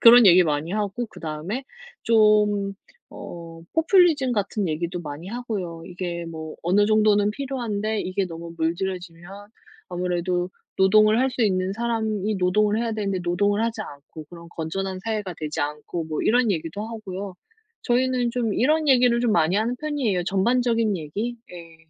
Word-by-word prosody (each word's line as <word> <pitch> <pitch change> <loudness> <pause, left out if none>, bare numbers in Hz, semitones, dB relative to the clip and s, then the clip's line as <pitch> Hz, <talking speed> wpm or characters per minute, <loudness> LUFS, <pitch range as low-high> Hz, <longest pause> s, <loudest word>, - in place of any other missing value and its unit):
그런 235 -1 +9
얘기 180 0 +8
많이 155 +1 -1
하고 210 +3 -2
그다음에 175 - -5 0.4
좀 210 -3 +3 0.4
어 165 -1 -9
포퓰리즘 325 -6 +4
같은 205 -2 -1
얘기도 170 +3 -2
많이 150 +1 -7
하고요. 200 -8 -5
이게 175 -1 -5
뭐 160 -1 -7
어느 200 +4 +3
정도는 210 -1 +3
필요한데 220 -5 -2
이게 185 +1 -1
너무 170 0 -8
물들여지면 175 +3 -4 0.4
아무래도 180 0 -1 0.3
노동을 215 +3 +5
할 265 - +3
수 250 -1 -1
있는 190 -1 +1
사람이 220 -3 -1
노동을 205 +4 +2
해야 230 -1 -1
되는데 200 -3 -2
노동을 205 +5 +1
하지 225 -1 -2
않고 150 -2 -11
그런 170 -1 -11
건전한 185 +4 -4
사회가 210 -5 -3
되지 155 -1 -4
않고 150 +3 -3
뭐 155 -1 -3
이런 240 0 +3
얘기도 185 +4 -3
하고요. 200 -4 -6 0.5
저희는 250 -1 +1
좀 230 -4 -1
이런 305 +4 +2
얘기를 245 -2 +4
좀 240 -2 +1
많이 170 +1 +3
하는 230 +3 0
편이에요. 250 - -1
전반적인 230 +2 +1
얘기? 205 +10 -4 0.2
예. 165 -2 -11
200 Hz, 340 characters per minute, -24 LUFS, 175-230 Hz, 0.5 s, 그런